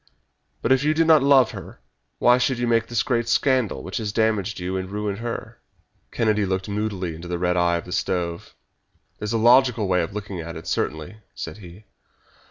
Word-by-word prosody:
But - - +1
if 130 0 +4
you 155 +1 +2
did 165 +1 +3
not 160 -2 +6
love 135 -3 +5
her - - -10 0.4
why 125 +1 +4
should 125 0 +1
you 120 - -1
make 115 -1 +1
this 115 -2 0
great 120 -2 0
scandal 130 -6 +1
which 95 - -5
has 105 -3 -3
damaged 110 -1 0
you 90 +1 -3
and 95 0 -3
ruined 105 0 -3
her?" 115 0 -6 0.5
Kennedy 110 -2 +1
looked 95 -1 -2
moodily 100 -4 -3
into 85 +2 -9
the 90 0 -2
red 90 0 0
eye 85 -1 +2
of 85 - -7
the 90 - -10
stove. 85 -2 -3 0.6
"That's 105 - -4
a 115 - +1
logical 120 -1 +4
way 90 -1 +2
of 85 - -3
looking 100 -3 -6
at 85 +1 -7
it, 80 - -9
certainly," 80 +7 -3 0.2
said - - -6
he. 95 0 -13
105 Hz, 200 wpm, -23 LUFS, 90-120 Hz, 0.6 s, not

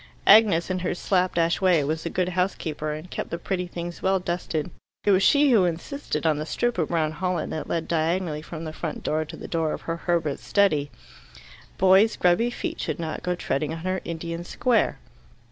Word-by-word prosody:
Agnes, 200 -5 +6
in 185 - -1
her 180 0 -2
slap 185 0 0
dash 170 +1 +1
way, 180 -5 +4
was 155 +3 -2
a - - -2
good 180 +1 0
housekeeper, 175 -4 -2
and 155 +4 -7
kept - - -4
the 170 - -3
pretty 180 0 -3
things 175 0 -6
well 190 0 +2
dusted. 175 -2 -3 0.3
It 205 - +3
was 190 0 +4
she 285 +6 +5
who 220 -6 +5
insisted 170 - -3
on 155 -2 +2
the 155 - -3
strip 240 0 -1
of 160 - +1
brown 160 -3 0
holland 180 -1 -2
that 155 - -4
led 165 -1 -1
diagonally 165 -1 0
from 165 0 -8
the 155 -1 -6
front 160 -1 -5
door 155 +1 0
to - - -9
the - - -8
door 160 -2 -1
of - - -5
Herbert's 165 -3 -2
study: 155 -9 +2 0.9
boys' 190 +4 +5
grubby 180 +7 +3
feet 240 - -5
should - - -2
not 160 -2 -4
go 180 0 -1
treading 155 -2 -2
on 165 - -5
her 185 +1 -2
Indian 170 0 -5
square. 235 +5 +1
175 Hz, 200 wpm, -25 LUFS, 160-185 Hz, 0.9 s, Agnes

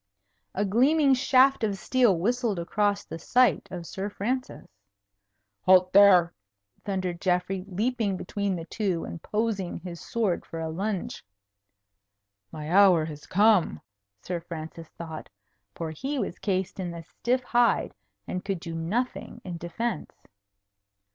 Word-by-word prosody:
A 205 - +1
gleaming 270 +8 +4
shaft 260 0 +4
of 205 -2 0
steel 240 -3 +3
whistled 230 +2 0
across 205 +4 0
the 165 - -7
sight 250 +5 +3
of 175 -2 -6
Sir 195 +4 -4
Francis. 250 +6 -3 0.9
"Halt 185 0 +5
there!" 185 -4 +7 0.5
thundered 185 -3 -3
Geoffrey, 180 +1 0
leaping 210 0 -1
between 200 +1 -2
the 165 -2 -6
two, 185 -3 -2
and 170 - -8
posing 210 -4 -2
his 175 -1 -8
sword 215 -7 -1
for 165 - -7
a 160 0 -3
lunge. 195 +2 -3 1.3
"My 155 +1 -6
hour 185 -4 +6
has 150 -2 -9
come," 200 - +3 0.4
Sir 180 -1 -3
Francis 165 -1 -8
thought. 160 -2 -7 0.5
For 165 -2 -4
he 270 - -4
was 210 - -3
cased 190 -1 -2
in 180 -2 -3
the 170 -1 -7
stiff 250 +9 -1
hide, 240 -1 +2 0.3
and 180 - -4
could 195 -3 -2
do 165 -1 -7
nothing 200 +11 -3
in 175 -2 -6
defence. 195 +4 -4
190 Hz, 135 wpm, -27 LUFS, 170-225 Hz, 1.3 s, there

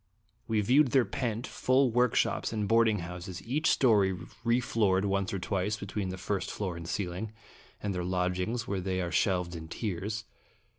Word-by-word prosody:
We 110 -1 +2
viewed 130 +5 +4
their 130 -3 +5
pent, 120 -2 -2
full 130 0 +2
workshops 125 0 +2
and 105 -2 -1
boarding 115 -3 +4
houses, 90 +1 -7
each 150 +7 +1
story 105 -7 +4 0.3
refloored 115 -5 +2
once 100 -1 0
or 100 - -1
twice 95 +3 -1
between 100 -1 -3
the 95 - -4
first 100 0 -2
floor 95 -4 -3
and 85 0 -7
ceiling, 100 +3 -3 0.5
and 100 -1 -1
their 90 -1 -2
lodgings 90 +5 -1
where 100 -2 -1
they 95 0 -1
are 90 -1 -2
shelved 90 -3 +1
in 80 -1 -7
tiers. 105 +4 -3
100 Hz, 165 wpm, -30 LUFS, 90-115 Hz, 0.5 s, their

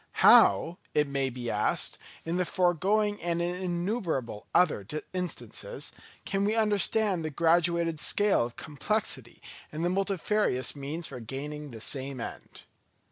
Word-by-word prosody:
How, 160 - +6 0.2
it 150 -1 +3
may 140 -1 0
be 120 -2 -4
asked, 105 - -1 0.3
in 165 +2 -1
the 180 - +2
foregoing 195 +4 +1
and 170 0 -1
in 175 +1 0
innumerable 175 - -2
other 175 - +3 0.3
instances, 185 - -3 0.3
can 195 0 0
we 210 +2 +1
understand 210 -3 +2
the 155 - -2
graduated 170 +1 +2
scale 205 - +3
of 120 0 -6
complexity 200 +9 -3 0.3
and 155 +3 -3
the - - +2
multifarious 195 -7 +1
means 145 +4 -4
for 130 -4 -6
gaining 145 +5 -6
the 115 -3 -10
same 135 +1 -3
end. - - -8
170 Hz, 135 wpm, -29 LUFS, 140-195 Hz, 0.3 s, How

